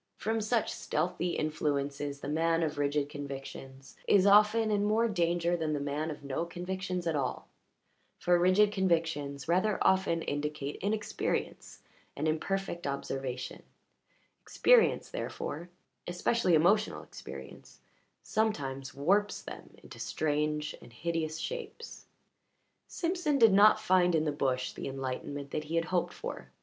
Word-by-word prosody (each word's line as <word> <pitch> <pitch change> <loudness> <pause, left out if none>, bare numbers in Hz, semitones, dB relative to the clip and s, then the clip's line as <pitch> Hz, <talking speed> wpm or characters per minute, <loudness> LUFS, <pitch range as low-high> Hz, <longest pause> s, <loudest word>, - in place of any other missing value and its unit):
From 220 +1 -1
such 220 +1 +1
stealthy 175 +2 -1
influences 145 -2 -2
the - - -5
man 165 +2 +1
of 150 -2 -2
rigid 145 0 +1
convictions 135 -2 -8
is 195 -1 +5
often 210 +2 +5
in 205 -1 +2
more 220 +3 +3
danger 175 -3 +1
than 160 -2 -1
the 145 - -1
man 145 +3 -2
of 150 -2 -7
no 140 +3 -2
convictions 180 +1 -4
at 165 -2 0
all, 135 -3 -2 0.7
for 175 0 +3
rigid 185 +4 +4
convictions 165 -8 0
rather 185 +5 +2
often 185 -3 +2
indicate 145 0 -3
inexperience 210 +2 -3 0.3
and 150 +3 -1
imperfect 175 +1 -2
observation; 135 -2 -4 0.8
experience, - - +3
therefore 175 - -5 0.4
especially 180 +1 +2
emotional 200 +7 +3
experience - - -11 0.4
sometimes 140 -11 -1
warps 200 +9 +1
them - - -9
into - - -12
strange 150 0 -1
and 120 - -14
hideous 160 +2 -2
shapes. 465 - -7 0.8
Simpson 335 -4 0
did 225 -5 +6
not 210 +2 +7
find 185 -4 +3
in 155 0 +2
the 150 - +1
bush 130 -3 -1
the - - -6
enlightenment 135 +1 -5
that 155 - -3
he 160 +2 -4
had 165 0 +2
hoped 180 0 0
for. - - -7
165 Hz, 135 wpm, -31 LUFS, 145-200 Hz, 0.8 s, not